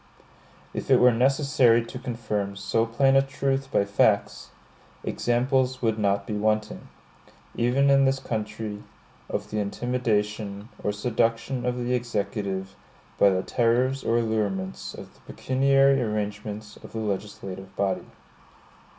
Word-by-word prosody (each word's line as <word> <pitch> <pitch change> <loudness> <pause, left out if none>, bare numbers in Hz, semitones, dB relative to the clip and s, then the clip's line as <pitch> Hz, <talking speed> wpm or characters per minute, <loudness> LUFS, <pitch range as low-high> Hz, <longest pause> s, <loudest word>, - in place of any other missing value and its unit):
If - - -5
it - - +6
were 125 -1 +6
necessary 130 -2 +3
to 125 - -8
confirm 110 -5 -3
so 115 +3 0
plain 135 +4 +3
a 135 - +7
truth 135 0 -2
by 100 - +2
facts, 100 0 +1 0.5
examples 130 +1 0
would 110 -1 +1
not 100 -1 +1
be 105 - -4
wanting, 110 +1 -1 0.7
even 130 +4 +3
in 135 0 +5
this 135 0 +2
country, 105 -3 -4 0.5
of 105 0 -4
the 105 - -1
intimidation 105 -2 -2
or 105 - +1
seduction 115 +3 -1
of 125 0 -1
the 125 0 -1
Executive 100 -5 -2 0.4
by 100 - +7
the 95 -1 0
terrors 125 +3 +1
or 115 - +2
allurements 105 -5 -2
of - - -11
the - - -24
pecuniary 135 +1 +3
arrangements 105 -1 -4
of - - -13
the - - -5
legislative 100 -2 -5
body. 100 -1 -1
115 Hz, 135 wpm, -26 LUFS, 105-125 Hz, 0.7 s, a